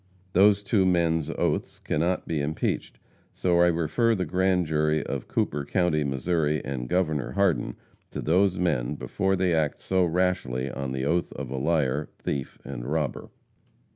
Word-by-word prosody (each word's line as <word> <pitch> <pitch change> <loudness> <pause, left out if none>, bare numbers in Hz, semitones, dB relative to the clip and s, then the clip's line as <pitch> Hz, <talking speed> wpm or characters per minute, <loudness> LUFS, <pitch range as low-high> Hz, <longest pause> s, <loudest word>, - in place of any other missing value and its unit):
Those 100 +2 +5
two 100 -1 +2
men's 85 -4 +2
oaths - - -1
cannot 85 +4 -1
be 80 -3 -1
impeached, 75 +2 -2 0.4
so 85 -1 +2
I 90 - +6
refer 85 +8 +2
the 95 -2 -1
grand 90 +2 +1
jury 75 -1 +1
of 70 -3 -4
Cooper 75 - -1
county, 85 -1 +1
Mo., 70 -1 -2
and 75 -5 -1
Gov. 80 -6 0
Hardin 95 -10 +1 0.3
to - - -6
those 90 +3 +2
men 75 -7 0
before 95 +6 -1
they 90 -2 +1
act 80 -3 0
so 95 -1 +1
rashly 85 -7 0
on 70 -1 -4
the 65 0 -2
oath 85 +4 0
of 65 -2 -6
a 65 - -3
liar, 75 -1 0
thief 70 -2 -4
and - - -6
robber. 75 0 -2
80 Hz, 160 wpm, -26 LUFS, 70-90 Hz, 0.4 s, I